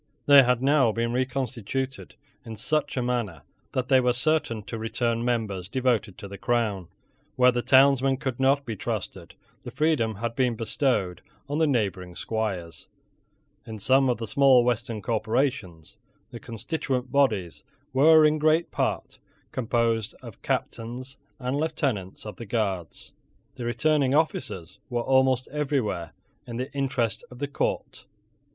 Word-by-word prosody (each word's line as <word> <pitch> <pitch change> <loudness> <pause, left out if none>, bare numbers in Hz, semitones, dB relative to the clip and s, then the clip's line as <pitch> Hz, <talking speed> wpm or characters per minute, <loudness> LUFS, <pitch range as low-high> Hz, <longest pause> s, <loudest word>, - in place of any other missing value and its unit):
They 140 0 +9
had 125 -1 +1
now 135 -4 +4
been 115 +2 -1
reconstituted 130 0 -3 0.3
in 115 - -8
such 150 +6 -1
a 125 - +1
manner 120 -8 -2 0.3
that 130 -1 -1
they 130 -1 +5
were 125 -1 +2
certain 125 -5 0
to 115 +3 -6
return 115 +1 -1
members 110 -7 -2
devoted 120 -6 0
to 105 -3 -8
the 100 0 -9
crown. 105 -7 0 0.5
Where 125 0 +5
the 120 0 -1
townsmen 135 0 +4
could 130 -2 -4
not 140 +1 +3
be 115 - -4
trusted, - - -5 0.3
the - - -8
freedom 125 -4 +1
had 115 +3 -4
been 125 -2 +1
bestowed 110 -5 -1 0.3
on 145 +2 -2
the 160 - +3
neighbouring 100 -9 -1
squires. 95 -9 -4 0.8
In 110 -1 -6
some 130 +5 +3
of 125 - +1
the 115 - -4
small 135 -1 +5
western 120 -3 -1
corporations, 110 - -2 0.3
the 120 - -8
constituent 125 +2 -3
bodies 110 - +1 0.3
were 155 +3 +6
in 150 0 +3
great 155 +2 +2
part - - -2 0.3
composed 115 -3 0
of - - -11
Captains 125 +4 -4 0.2
and 130 +1 -2
Lieutenants 135 - -2
of 105 -3 -7
the 115 - -8
Guards. 100 -6 -3 0.4
The 120 - -7
returning 140 +3 +2
officers 105 - -2
were 120 -1 -1
almost 130 -1 +3
everywhere 135 - -2 0.3
in 120 -1 -5
the 130 +2 -5
interest 130 -6 -1
of 125 - -12
the 145 +2 -3
court. 140 - -3
125 Hz, 145 wpm, -26 LUFS, 110-135 Hz, 0.8 s, They